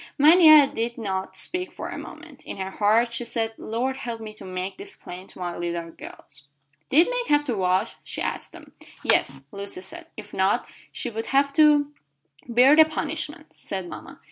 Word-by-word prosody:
Mania 310 Hz, 0 st, +8 dB
did 235 Hz, -3 st, -3 dB
not 190 Hz, -3 st, -4 dB
speak 360 Hz, -, -4 dB
for -, -, -7 dB
a -, -, -6 dB
moment. -, -, -11 dB
In -, -, -6 dB
her 190 Hz, 0 st, -4 dB
heart 225 Hz, +4 st, +2 dB
she 235 Hz, -, -3 dB
said, 225 Hz, -1 st, -2 dB
"Lord 255 Hz, +4 st, -2 dB
help 235 Hz, -3 st, -5 dB
me 215 Hz, -1 st, -8 dB
to 215 Hz, -, -12 dB
make 185 Hz, -, -5 dB
this 395 Hz, 0 st, -6 dB
plain 180 Hz, +2 st, -10 dB
to -, -, -16 dB
my 175 Hz, -1 st, -4 dB
little 170 Hz, -1 st, -4 dB
girls." 140 Hz, -3 st, -12 dB, 0.4 s
"Did 320 Hz, +6 st, +6 dB
Meg -, -, -2 dB
have 295 Hz, 0 st, +3 dB
to 245 Hz, -5 st, -1 dB
wash?" 185 Hz, -1 st, 0 dB
she -, -, -6 dB
asked -, -, -4 dB
them. -, -, -14 dB, 0.3 s
"Yes," -, -, +3 dB
said 135 Hz, 0 st, -8 dB
Lucy. 200 Hz, -2 st, -7 dB, 0.2 s
"If 210 Hz, -1 st, -10 dB
not, 190 Hz, +1 st, +1 dB, 0.3 s
she 245 Hz, -, -4 dB
would 225 Hz, +1 st, -5 dB
have 280 Hz, +1 st, +2 dB
to 295 Hz, -1 st, +4 dB, 0.3 s
" 145 Hz, -, -29 dB
"Bear 250 Hz, +5 st, +6 dB
the 315 Hz, 0 st, +8 dB
punishment," 315 Hz, 0 st, -5 dB
said 190 Hz, -2 st, -5 dB
mama. -, -, -10 dB
230 Hz, 195 wpm, -24 LUFS, 190-290 Hz, 0.4 s, Mania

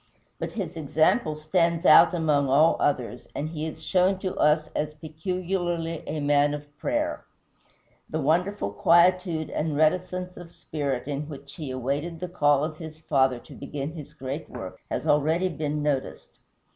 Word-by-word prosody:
But -, -, -4 dB
his 185 Hz, -6 st, -4 dB
example 155 Hz, -, +2 dB
stands 170 Hz, +2 st, +1 dB
out 170 Hz, +3 st, +8 dB
among 150 Hz, -4 st, +2 dB
all 150 Hz, +5 st, +5 dB
others, 125 Hz, -3 st, -1 dB
and 150 Hz, +2 st, -2 dB
he 160 Hz, -1 st, -4 dB
is 160 Hz, 0 st, -8 dB
shown 185 Hz, +3 st, +2 dB
to 185 Hz, -2 st, -3 dB
us 155 Hz, +1 st, +3 dB
as 150 Hz, 0 st, -2 dB
peculiarly 170 Hz, +1 st, -3 dB
a 155 Hz, +1 st, -3 dB
man 145 Hz, 0 st, +3 dB
of 145 Hz, 0 st, -11 dB
prayer. 300 Hz, +2 st, -1 dB, 0.9 s
The 155 Hz, -, -2 dB
wonderful 170 Hz, -, +1 dB
quietude 170 Hz, -, +3 dB
and 150 Hz, -1 st, -1 dB
reticence 180 Hz, +3 st, 0 dB
of 175 Hz, -1 st, -10 dB
spirit 140 Hz, -4 st, -3 dB
in 145 Hz, +1 st, -3 dB
which 140 Hz, -1 st, -10 dB
he 155 Hz, -5 st, -5 dB
awaited 140 Hz, +6 st, -3 dB
the 180 Hz, -, -4 dB
call 145 Hz, -4 st, +3 dB
of 155 Hz, 0 st, -3 dB
his 160 Hz, -1 st, -9 dB
Father 135 Hz, -5 st, +2 dB
to -, -, -14 dB
begin 140 Hz, +1 st, -5 dB
his 155 Hz, -4 st, -10 dB
great 135 Hz, +4 st, -5 dB
work 95 Hz, -1 st, -8 dB
has -, -, -3 dB
already 160 Hz, +4 st, +2 dB
been 150 Hz, -2 st, -3 dB
noticed. 140 Hz, -3 st, -3 dB
155 Hz, 160 wpm, -26 LUFS, 145-170 Hz, 0.9 s, out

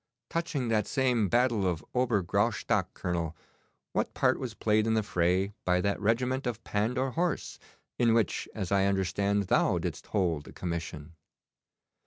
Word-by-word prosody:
Touching 155 Hz, -7 st, -1 dB
that 110 Hz, -2 st, +1 dB
same 125 Hz, -7 st, +1 dB
battle 120 Hz, -4 st, +2 dB
of 85 Hz, -3 st, -2 dB
Ober 120 Hz, -6 st, +2 dB
Graustock, 100 Hz, 0 st, +1 dB
Colonel, 85 Hz, -3 st, -2 dB, 0.6 s
what -, -, -1 dB
part -, -, +2 dB
was 125 Hz, -5 st, -5 dB
played 110 Hz, 0 st, +2 dB
in 110 Hz, -, +2 dB
the 110 Hz, -, +2 dB
fray 90 Hz, +2 st, +1 dB
by 90 Hz, 0 st, +2 dB
that 100 Hz, +3 st, 0 dB
regiment 125 Hz, +5 st, +1 dB
of 115 Hz, -2 st, -4 dB
Pandour 125 Hz, +6 st, 0 dB
horse, 170 Hz, +3 st, -2 dB, 0.4 s
in 115 Hz, -2 st, +4 dB
which, 115 Hz, -5 st, 0 dB
as 95 Hz, -, -3 dB
I 100 Hz, -1 st, +3 dB
understand, 100 Hz, +1 st, +1 dB
thou 90 Hz, -, +2 dB
didst -, -, -4 dB
hold 85 Hz, -8 st, 0 dB
a -, -, -11 dB
commission? 85 Hz, -2 st, -5 dB
105 Hz, 155 wpm, -29 LUFS, 90-120 Hz, 0.6 s, in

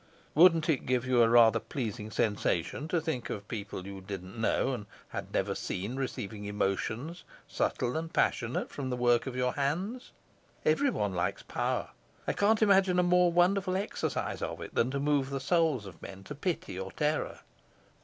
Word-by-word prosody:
"Wouldn't 165 Hz, 0 st, +6 dB
it 155 Hz, -6 st, 0 dB
give 125 Hz, 0 st, +1 dB
you 125 Hz, -2 st, +4 dB
a 115 Hz, -, +5 dB
rather 115 Hz, -1 st, +6 dB
pleasing 110 Hz, -4 st, -4 dB
sensation 105 Hz, -, 0 dB
to 170 Hz, +1 st, +1 dB
think 155 Hz, -6 st, -3 dB
of 100 Hz, -1 st, -5 dB
people 105 Hz, -4 st, -5 dB
you 100 Hz, -1 st, -7 dB
didn't 95 Hz, 0 st, -7 dB
know 115 Hz, +3 st, +1 dB
and 105 Hz, -5 st, -5 dB, 0.2 s
had -, -, -6 dB
never -, -, 0 dB
seen 100 Hz, +7 st, -4 dB
receiving 115 Hz, -6 st, -4 dB
emotions, 110 Hz, -, -2 dB, 0.2 s
subtle 125 Hz, 0 st, -1 dB
and 160 Hz, +1 st, -3 dB
passionate, 120 Hz, -7 st, 0 dB
from 135 Hz, -2 st, -4 dB
the 125 Hz, -, -1 dB
work 120 Hz, 0 st, +3 dB
of 130 Hz, -, -4 dB
your 125 Hz, 0 st, +1 dB
hands? 180 Hz, -, -2 dB, 0.6 s
Everyone 245 Hz, -, +2 dB
likes 90 Hz, +3 st, -1 dB
power. -, -, -2 dB, 0.4 s
I -, -, +1 dB
can't 215 Hz, +2 st, +3 dB
imagine 195 Hz, -3 st, +4 dB
a 180 Hz, -, +4 dB
more 180 Hz, 0 st, +4 dB
wonderful 185 Hz, +2 st, +3 dB
exercise 200 Hz, -, -2 dB
of -, -, -3 dB
it -, -, -8 dB
than 120 Hz, -, +2 dB
to 140 Hz, +1 st, -2 dB
move 140 Hz, -1 st, +1 dB
the 140 Hz, 0 st, -2 dB
souls 150 Hz, -, +2 dB
of 95 Hz, -4 st, -11 dB
men 95 Hz, 0 st, -9 dB
to 145 Hz, -, -7 dB
pity 145 Hz, -, -3 dB
or 95 Hz, 0 st, -5 dB
terror." 150 Hz, +5 st, -1 dB
130 Hz, 175 wpm, -30 LUFS, 105-165 Hz, 0.6 s, Wouldn't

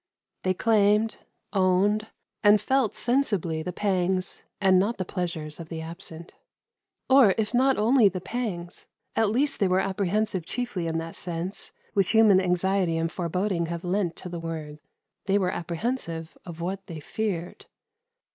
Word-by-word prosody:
They 185 Hz, 0 st, 0 dB
claimed, 215 Hz, +1 st, +3 dB, 0.4 s
owned, 200 Hz, +3 st, +2 dB, 0.4 s
and 205 Hz, 0 st, +7 dB
felt 260 Hz, +1 st, +1 dB
sensibly 205 Hz, -, 0 dB
the 180 Hz, -, -4 dB
pangs 185 Hz, -1 st, -1 dB, 0.2 s
and 190 Hz, -2 st, +5 dB
not 210 Hz, +5 st, 0 dB
the 185 Hz, -, -3 dB
pleasures 170 Hz, -5 st, -4 dB
of 165 Hz, -1 st, -8 dB
the 165 Hz, -, -5 dB
absent. 165 Hz, 0 st, -9 dB, 0.7 s
Or 260 Hz, -8 st, +6 dB
if 220 Hz, +1 st, -1 dB
not 265 Hz, +2 st, +3 dB
only 225 Hz, 0 st, +5 dB
the 190 Hz, -, -5 dB
pangs, 185 Hz, -5 st, -5 dB, 0.3 s
at 225 Hz, -2 st, +3 dB
least 270 Hz, +7 st, +1 dB
they 200 Hz, -, +3 dB
were 185 Hz, +1 st, +2 dB
apprehensive 195 Hz, 0 st, 0 dB
chiefly 205 Hz, -3 st, -3 dB
in 165 Hz, 0 st, -1 dB
that 165 Hz, 0 st, -5 dB
sense 175 Hz, +2 st, -5 dB, 0.2 s
which 195 Hz, 0 st, +2 dB
human 215 Hz, -4 st, +6 dB
anxiety 180 Hz, -1 st, +1 dB
and 165 Hz, 0 st, -1 dB
foreboding 180 Hz, 0 st, -1 dB
have 170 Hz, 0 st, -5 dB
lent 180 Hz, -1 st, 0 dB
to -, -, -7 dB
the 170 Hz, -1 st, -5 dB
word; 155 Hz, -2 st, -6 dB, 0.5 s
they 195 Hz, +1 st, +3 dB
were 185 Hz, -2 st, +1 dB
apprehensive 170 Hz, -2 st, -3 dB
of 170 Hz, -1 st, -8 dB
what 190 Hz, +2 st, -4 dB
they 165 Hz, -3 st, -7 dB
feared. 175 Hz, +1 st, -4 dB
185 Hz, 155 wpm, -26 LUFS, 170-210 Hz, 0.7 s, and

